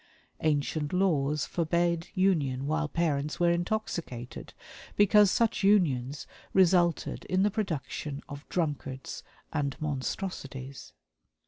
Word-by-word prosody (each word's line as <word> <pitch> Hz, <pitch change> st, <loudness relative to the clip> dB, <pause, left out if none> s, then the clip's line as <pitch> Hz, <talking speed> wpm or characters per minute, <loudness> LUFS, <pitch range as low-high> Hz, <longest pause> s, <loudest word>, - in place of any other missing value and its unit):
Ancient 150 Hz, 0 st, 0 dB
laws 150 Hz, -6 st, +2 dB
forbade 170 Hz, 0 st, 0 dB
union 150 Hz, -9 st, +1 dB
while 155 Hz, +1 st, 0 dB
parents 150 Hz, -1 st, -1 dB
were 175 Hz, -1 st, +4 dB
intoxicated, 170 Hz, -, -3 dB, 0.4 s
because 205 Hz, 0 st, +6 dB
such 230 Hz, +3 st, +1 dB
unions 145 Hz, -10 st, +2 dB, 0.3 s
resulted 175 Hz, -2 st, +3 dB
in 185 Hz, +1 st, +1 dB
the 205 Hz, -, +3 dB
production 155 Hz, -, -3 dB
of 145 Hz, 0 st, -9 dB
drunkards 145 Hz, -6 st, -3 dB, 0.3 s
and 140 Hz, -1 st, -1 dB
monstrosities. 140 Hz, -2 st, -4 dB
160 Hz, 100 wpm, -29 LUFS, 140-185 Hz, 0.4 s, because